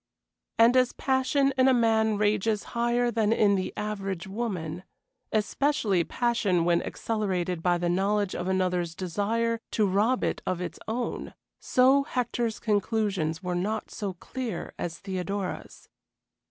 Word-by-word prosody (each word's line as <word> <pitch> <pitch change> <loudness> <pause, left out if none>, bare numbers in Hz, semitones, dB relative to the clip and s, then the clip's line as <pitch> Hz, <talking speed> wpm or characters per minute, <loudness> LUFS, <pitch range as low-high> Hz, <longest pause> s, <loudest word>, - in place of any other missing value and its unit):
And 230 +2 +6
as 255 -1 +3
passion 270 +1 +1
in 255 - +6
a 260 - +5
man 220 -2 +3
rages 210 0 +1
higher 240 +1 +1
than 220 -2 +1
in 210 -3 +4
the 190 -1 -1
average 195 -4 -3
woman, 190 -5 -4 0.5
especially 215 - +1
passion 210 -7 +1
when 170 0 +3
accelerated 185 -6 -2
by 175 0 +2
the 175 0 -1
knowledge 195 +2 +1
of 175 - -3
another's 180 -3 0
desire 215 +6 -1
to 215 - +1
rob 210 +6 +2
it - - -1
of 185 -1 -2
its 180 - -5
own, 235 +2 -3 0.2
so 265 +2 +4
Hector's 240 -4 -2
conclusions 205 -6 0
were 180 -1 -2
not 205 +5 -2
so 200 -3 -4
clear 245 +6 -5
as 165 -1 -3
Theodora's. 195 0 -5
210 Hz, 140 wpm, -27 LUFS, 185-230 Hz, 0.5 s, And